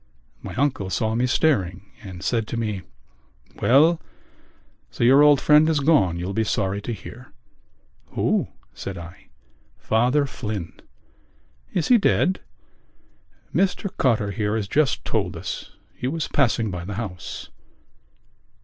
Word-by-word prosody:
My - - -7
uncle 130 -8 0
saw 110 +2 0
me 120 +2 +1
staring 100 - 0
and 95 -2 -9
said 115 +2 0
to 120 - -4
me: 105 -4 -2 0.8
"Well, 155 +7 +5 0.9
so - - -3
your 135 +4 +7
old 145 -2 +6
friend 150 +3 +5
is 155 -2 +2
gone, 135 - +3
you'll 90 +3 -4
be 110 - +1
sorry 100 -1 -1
to 110 - -5
hear." 110 +5 -9 0.8
"Who?" - - +1 0.3
said 95 -1 -6
I. 90 +3 -11 0.5
"Father 125 +6 +2
Flynn." 105 -9 -5 1.0
"Is 170 - -1
he 245 -2 +7
dead?" 190 -2 +2 1.1
"Mr 190 +1 0
Cotter 110 -6 +1
here 105 +2 -1
has 105 -3 -2
just 145 +6 +1
told - - -1
us. - - -6 0.2
He 125 - -4
was 160 +3 -2
passing 115 -6 +1
by 90 -1 -5
the 100 +3 -6
house." 95 -6 -6
115 Hz, 135 wpm, -23 LUFS, 100-145 Hz, 1.1 s, your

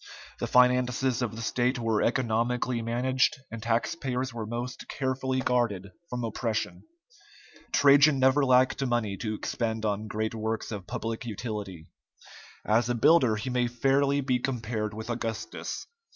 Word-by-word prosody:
The - - -2
finances 125 0 +3
of 115 -3 -2
the 115 - -6
state 125 +2 +1
were 115 -2 0
economically 120 0 0
managed, 125 +4 +1
and 115 -1 -6
taxpayers 125 +2 -1
were 115 -2 -5
most 120 +3 -5
carefully 130 -1 -1
guarded 110 -6 0 0.2
from 125 -1 -3
oppression. 115 0 -2 0.9
Trajan 140 +1 +6
never 130 +2 +4
lacked 130 +1 +3
money 120 -6 0
to 110 +2 -3
expend 110 0 -2
on 105 +1 -1
great 110 +2 -2
works 110 0 -3
of 100 -4 -6
public 115 -1 -4
utility; 105 -6 -5 0.8
as 115 +2 +2
a 120 - +1
builder, 125 -2 +5
he 125 +5 -4
may 125 -1 +1
fairly 135 +3 +2
be 130 -2 +1
compared 115 -4 -3
with 110 0 -6
Augustus. 115 -1 -4
120 Hz, 140 wpm, -28 LUFS, 110-130 Hz, 0.9 s, Trajan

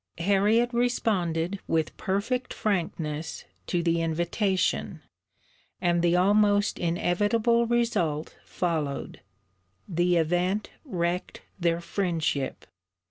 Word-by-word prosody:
Harriet 205 +7 +2
responded 200 -7 0
with 160 -1 0
perfect 220 +6 -2
frankness 165 -6 -2 0.2
to 175 -2 0
the 165 0 +2
invitation; 175 +4 0 0.8
and 175 -1 +2
the 175 0 +3
almost 205 +2 +3
inevitable 205 +7 +2
result 205 -11 0
followed. 160 -6 -3 0.7
The 175 0 +2
event 180 +5 0
wrecked 180 - -2 0.2
their 170 -1 +1
friendship. 165 -7 -2
180 Hz, 85 wpm, -27 LUFS, 170-210 Hz, 0.8 s, the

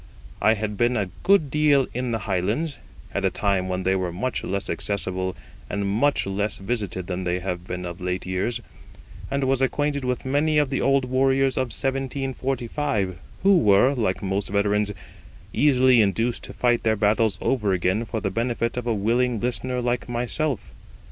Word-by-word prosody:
I 110 - +4
had 105 -1 -4
been 120 +2 +2
a 95 -4 -2
good 185 -8 +3
deal 150 -2 +4
in 125 +1 -2
the 115 - 0
Highlands 105 - -1 0.3
at - - -1
a - - +3
time 95 -2 0
when 90 0 -2
they 95 +1 +2
were 90 -2 -1
much 100 +9 -3
less 100 +1 -3
accessible 95 -2 -2 0.3
and 100 -1 -2
much 120 +9 +2
less 100 +2 -1
visited 95 -3 -3
than 90 0 -3
they 90 0 0
have 90 -1 -4
been 90 0 -4
of 85 +1 -7
late 90 0 -2
years, 95 +6 -1 0.7
and 140 +1 -1
was 135 0 +1
acquainted 145 +1 0
with 125 0 -2
many 150 +3 +2
of 145 -2 +2
the 135 - 0
old 135 -1 +3
warriors 135 +1 +2
of 130 - +1
1745, 135 - 0 0.2
who 195 -2 +6
were, 105 +6 +5
like 110 -7 -1
most 95 +1 -1
veterans, 100 +1 +1 0.6
easily 130 -4 +5
induced 115 +4 0
to - - -9
fight 120 -1 +2
their 110 -1 +2
battles 105 0 +2
over 110 -7 0
again 95 +4 +1
for 115 0 -4
the 100 -2 -2
benefit 115 0 -1
of 125 -1 -3
a 115 - +1
willing 115 +3 +1
listener 125 +2 -2
like 120 0 -1
myself. 120 +1 -1
115 Hz, 175 wpm, -24 LUFS, 100-130 Hz, 0.7 s, who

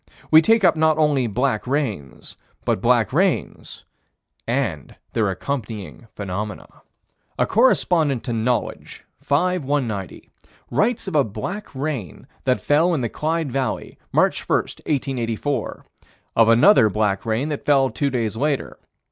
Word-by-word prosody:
We 160 0 +9
take 225 +5 +3
up 175 -2 +5
not 160 0 +2
only 145 -5 +2
black 125 +1 -1
rains 110 - -3 0.3
but - - 0
black - - +2
rains - - -1 0.6
and 115 - -2 0.2
their 110 -3 +1
accompanying 110 - -5
phenomena. 105 +2 -5 0.7
A - - +2
correspondent 170 - +2
to 120 - -3
Knowledge, 115 +2 -2 0.2
5 180 +4 +1
190, 120 -9 -3 0.4
writes 215 - 0
of 185 - -4
a 145 - +5
black 185 - -5
rain 130 - -4 0.2
that 130 -1 +2
fell 165 +4 +2
in 140 - -1
the 120 - -1
Clyde 160 0 -2
Valley, 135 0 -3
March - - +1
1, - - +4
1884: 135 -2 -3 0.5
of 115 0 +5
another 115 - +6
black 100 -1 0
rain 115 +6 -1
that 150 - -4
fell 135 -2 +3
two 140 - -1
days 115 -5 -2
later. 140 +3 -2
135 Hz, 135 wpm, -22 LUFS, 110-155 Hz, 0.7 s, We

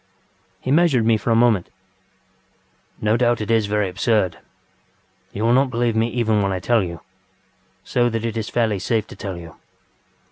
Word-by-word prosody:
ŌĆØ 95 0 -40
He 130 - -3
measured 145 -7 +3
me 115 0 +4
for 110 - -3
a 115 - +4
moment. 115 -6 +3 1.3
ŌĆ£No 110 +2 +2
doubt 120 -1 +2
it 105 +1 -3
is 110 -2 +2
very 105 -1 0
absurd. 95 -1 0 0.9
You 105 - -4
will 115 +1 +3
not 135 +1 +3
believe 120 -1 0
me 110 +1 +2
even 115 -3 0
when 100 -1 0
I 95 - -1
tell 115 +5 +2
you, 85 -2 -7 0.8
so 120 -1 +1
that 115 0 -3
it 115 -1 -3
is 110 -2 -3
fairly 110 -4 0
safe 110 +3 -1
to - - -12
tell 95 -3 -6
you. 85 -2 -11
110 Hz, 185 wpm, -21 LUFS, 100-120 Hz, 1.3 s, me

